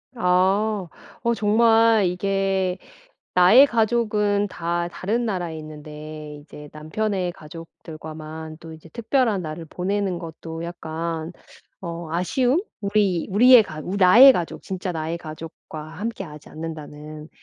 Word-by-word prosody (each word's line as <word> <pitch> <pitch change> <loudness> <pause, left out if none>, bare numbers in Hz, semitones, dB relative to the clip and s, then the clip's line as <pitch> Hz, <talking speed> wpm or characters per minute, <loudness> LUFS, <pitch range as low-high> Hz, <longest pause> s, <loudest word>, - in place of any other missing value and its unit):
아. 190 +1 +1 0.4
어 235 0 +2
정말 225 0 +4
이게 190 0 0 0.6
나의 185 +10 +7
가족은 215 -4 +1
다 170 0 -2
다른 220 +7 -2
나라에 175 -6 -3
있는데 150 0 -9
이제 150 0 -12
남편의 180 +4 -2
가족들과만 155 -1 -10
또 165 -1 -10
이제 160 +1 -15
특별한 230 - 0
날을 155 +1 -6
보내는 185 +1 -2
것도 165 0 -7
약간 165 0 -5 0.5
어 170 -2 -6
아쉬움? 250 - +1 0.2
우리 200 -4 +1
우리의 245 +3 +7
가 155 -6 -8
우 190 +3 -4
‘나의 230 +9 +8
가족, 175 -7 -4
진짜 185 -1 -4
나의 165 +1 -3
가족과 155 -1 -9
함께 195 +6 -5
하지 150 -2 -12
않는다.‘는 155 -1 -8
180 Hz, 260 characters per minute, -23 LUFS, 160-205 Hz, 0.6 s, 나의